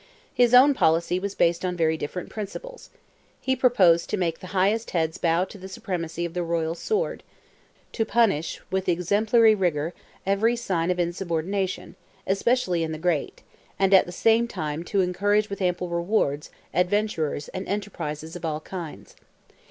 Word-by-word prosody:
His 245 0 +4
own 275 +3 +8
policy 170 -4 +2
was 200 +1 -4
based 170 +1 +2
on 180 -1 -2
very 160 -1 +2
different 160 +4 -5
principles. 355 - -8 0.5
He 260 - 0
proposed 195 -10 +4
to - - -1
make 170 -3 -1
the 185 - -9
highest 200 +5 +1
heads 160 +1 -1
bow 170 +1 +2
to 200 +1 -12
the 190 - -8
supremacy 170 -3 -4
of 170 - -6
the 180 - -2
royal 165 -1 -1
sword—to 425 - -5
punish 200 -9 +1
with 190 0 -1
exemplary 210 +6 +4
rigour 170 -5 0 0.3
every 205 +5 +2
sign 185 -8 -1
of 180 0 0
insubordination, 180 +2 -2 0.3
especially 195 -3 +1
in 160 -1 -2
the - - -4
great—and, 180 +3 -2
at 190 - +6
the - - -6
same 225 +5 +3
time, 155 -6 -4
to 195 +2 +1
encourage 205 +3 +1
with 200 - -5
ample 180 -1 0
rewards, 170 -4 0 0.2
adventurers, 180 -6 0
and 185 - -6
enterprises 165 -6 -4
of 175 - -8
all 155 -2 -2
kinds. 170 -2 -8
180 Hz, 155 wpm, -25 LUFS, 165-205 Hz, 0.5 s, own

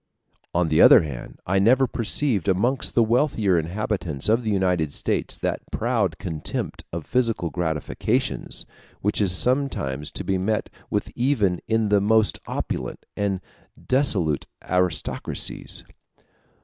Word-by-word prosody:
On 85 -2 +2
the 80 - +4
other - - +9
hand, 70 -6 -7
I 95 +2 +2
never 125 +7 +5
perceived 115 - 0
amongst 120 +8 +1
the 120 - +5
wealthier 110 - +2
inhabitants 90 -3 -2
of 115 +3 +4
the 110 - -2
United 90 -6 +1
States - - -1
that - - -2
proud - - 0
contempt 80 -4 -4
of 85 -2 -5
physical 115 -9 0
gratifications 80 -4 -2 0.4
which 105 +1 +1
is 95 -3 +2
sometimes 90 - 0
to - - -4
be 95 -1 0
met 110 +3 -1 0.2
with 105 - -1
even 120 -8 +1
in 110 -1 +1
the 100 -1 +4
most 110 +1 +3
opulent - - -4
and 100 -2 -1 0.4
dissolute 95 - +1 0.2
aristocracies. 90 -4 -2
100 Hz, 130 wpm, -24 LUFS, 85-115 Hz, 0.4 s, other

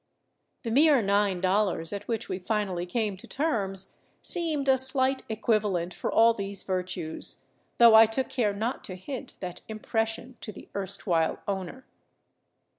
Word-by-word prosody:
The 230 - -3
mere 290 +2 +5
nine 200 -2 +1
dollars 185 -3 0
at 205 0 -6
which 225 -3 -3
we 185 - -4
finally 190 -3 -2
came 210 0 -2
to - - -13
terms 200 - -1 0.3
seemed 315 -5 -2
a 265 -1 +4
slight 260 0 +3
equivalent 210 -5 0
for - - -4
all 230 +1 +5
these 200 -2 -5
virtues, 180 -3 0 0.3
though 235 -1 +7
I 220 0 +8
took 255 +4 -2
care 230 -6 0
not 225 +5 -3
to 185 - -7
hint 235 +8 -7
that 180 -2 -6
impression 225 +2 -3
to 215 - -6
the - - -13
erstwhile 190 -4 0
owner. 195 +6 -5
210 Hz, 150 wpm, -27 LUFS, 190-240 Hz, 0.3 s, I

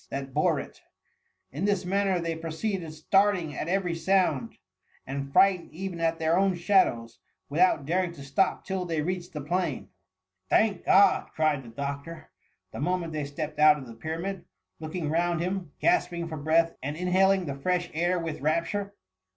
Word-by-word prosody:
that 135 -1 -5
bore - - +2
it - - -10 0.7
In 150 +9 -3
this 200 -3 +1
manner 195 0 +1
they 165 -1 -2
proceeded 165 +2 -3
starting 175 0 +1
at - - -4
every 180 -1 0
sound, 190 +6 +1 0.5
and 140 +1 -5
frightened 190 +2 +4
even 185 -1 -5
at 165 0 +1
their 165 +2 +2
own 195 -1 +2
shadows, 170 - +1 0.3
without 155 -1 +3
daring 180 +3 0
to 140 -4 -10
stop 140 +8 0
till 190 -1 -2
they 165 -4 -2
reached 180 +1 -3
the 150 - -4
plain. 170 -1 -2 0.6
Thank 215 -4 +2
God 200 +1 +5
T - - -25
cried 155 -3 +1
the 120 - -11
doctor, 140 +6 -6 0.4
the - - -7
mo 180 +6 +1
ment 165 -3 -6
they 150 -2 -2
stepped 150 +1 -5
out 150 0 +7
of 135 - -8
the 115 - -10
Pyramid; 165 +9 -5 0.3
looking 155 -1 -4
round 170 +1 +1
him, 180 -2 -3
gasping 175 - +1
for 160 - -5
breath, 165 +3 +2
and 145 +3 -4
inhaling 185 +1 +3
the 140 - -3
fresh 175 +5 -1
air 175 +3 +1
with 165 -4 -4
rapture. 170 +7 -1
170 Hz, 175 wpm, -27 LUFS, 150-185 Hz, 0.7 s, out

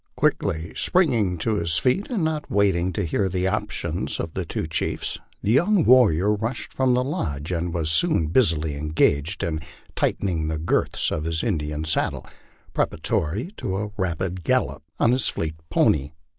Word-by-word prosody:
Quickly 80 +1 0
springing 115 - +2
to 105 +6 0
his 85 -3 +1
feet, 130 - +1
and 225 -9 -1
not 155 -1 -2
waiting 95 -3 +2
to - - -1
hear 95 +4 0
the 90 0 -1
opinions 95 - -2
of 85 -2 -4
the - - -3
two - - -3
chiefs, 80 - -2 0.2
the 100 - +1
young 175 - +4
warrior 105 - +5
rushed 115 +4 -4
from 130 -2 +2
the 125 - +2
lodge, 80 - -3
and 85 0 -1
was 80 -2 +1
soon 155 - +4
busily 80 - +2
engaged 75 +3 +1
in 80 -2 -1 0.4
tightening 85 -6 0
the 80 0 -2
girths 80 - 0
of 75 - -2
his 80 0 -1
Indian 75 -7 -2
saddle, 80 - -1 0.5
preparatory 100 - 0
to 95 0 -3
a 105 +1 -3
rapid 90 -1 -2
gallop 70 -1 0 0.2
on 115 - +4
his 125 -1 +1
fleet 80 -1 -3 0.2
pony. 75 -2 +2
90 Hz, 165 wpm, -24 LUFS, 80-115 Hz, 0.5 s, warrior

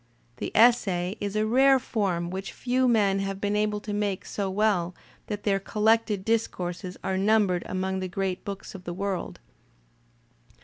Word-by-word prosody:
The - - -4
essay 200 -6 +4
is 205 0 -3
a 215 0 +2
rare 265 +4 +5
form 190 -9 -1
which 190 +1 -5
few 255 +1 +1
men 205 -5 +3
have 195 0 -3
been 205 +1 -1
able 210 0 +1
to 210 0 -5
make 205 -2 -1
so 200 -2 -3
well 190 -3 +1 0.3
that 205 -1 -4
thdr 195 -2 +1
collected 215 -2 +1
discourses 185 -5 -2
are 190 0 -1
numbered 200 -3 +3
among 190 +1 -2
the 185 - -3
great 190 0 -3
books 200 +1 -7
of 190 -2 -9
the 175 - -4
world. 195 -1 -3
200 Hz, 165 wpm, -27 LUFS, 190-215 Hz, 0.3 s, rare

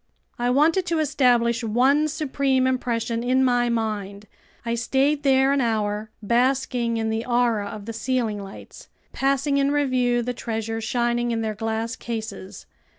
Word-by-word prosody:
I 240 0 +1
wanted 320 +8 +3
to 335 -1 0
establish 250 -6 +2
one 260 +7 +3
supreme 275 -4 0
impression 235 -2 -1
in 255 +2 +2
my 245 -1 +2
mind. 210 -3 -3 0.4
I 230 - -1
stayed 270 +5 +1
there 270 -1 +3
an 280 - +1
hour, 215 -2 -1
basking 245 0 +1
in 220 0 -1
the 220 +1 -2
aura 240 -4 +1
of 205 0 -8
the 230 - -5
ceiling 225 -3 -1
lights, 195 0 -12 0.2
passing 275 +1 +1
in 275 0 +2
review 255 -4 +1
the 250 +1 -3
treasures 225 -1 -4
shining 240 -1 0
in 230 -1 -1
their 220 -1 -2
glass 225 +1 -3
cases. 220 -5 -7
240 Hz, 150 wpm, -23 LUFS, 225-265 Hz, 0.4 s, wanted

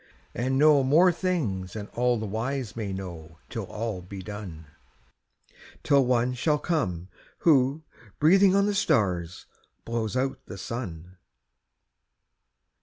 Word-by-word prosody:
And 130 +2 -1
know 150 0 +6
more 165 +7 +5
things 135 - -2
than 105 -2 -5
all 125 0 +1
the 110 - -4
wise 115 +2 -3
may 105 -4 -4
know 85 -4 -7
Till 115 -3 -4
all 105 -1 -4
be 95 +1 -9
done; 95 -6 -8 1.2
Till 140 -2 +4
One 125 0 +1
shall 150 +5 +1
come 95 - -2 0.3
who, 145 -1 +3 0.3
breathing 190 +5 +5
on 200 0 +4
the 205 - 0
stars, 95 - 0 0.4
Blows 115 0 -2
out 135 +1 -1
the 95 - -8
sun. 90 -5 -6
115 Hz, 125 wpm, -26 LUFS, 95-140 Hz, 1.2 s, know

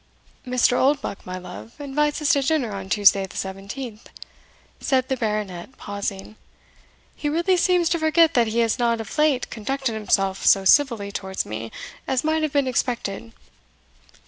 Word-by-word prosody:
"Mr. 250 0 +3
Oldbuck, 275 -6 0
my 185 0 -4
love, 180 +5 -10
invites 295 +1 -1
us 290 - +2
to 285 -4 +4
dinner 275 -5 0
on 190 -1 -6
Tuesday 200 -1 +5
the - - -15
17th," 205 +4 -6 0.7
said 260 -2 +1
the 265 - 0
Baronet, 210 -2 -3
pausing; 200 +1 -5 0.8
"he 295 - -2
really 340 +5 +2
seems 360 -1 +3
to 335 - 0
forget 315 +1 +4
that 235 -2 +3
he 230 +2 +1
has 230 0 +1
not 235 -1 +1
of 225 - -7
late 300 -4 +2
conducted 265 +2 -2
himself 195 -3 0
so 195 -1 +5
civilly 230 -5 +3
towards 190 -1 -3
me 110 +2 -6 0.4
as 260 -2 0
might 315 +1 +1
have 310 -2 -1
been 280 -1 +2
expected." 235 -3 -2
235 Hz, 160 wpm, -23 LUFS, 200-285 Hz, 0.8 s, Tuesday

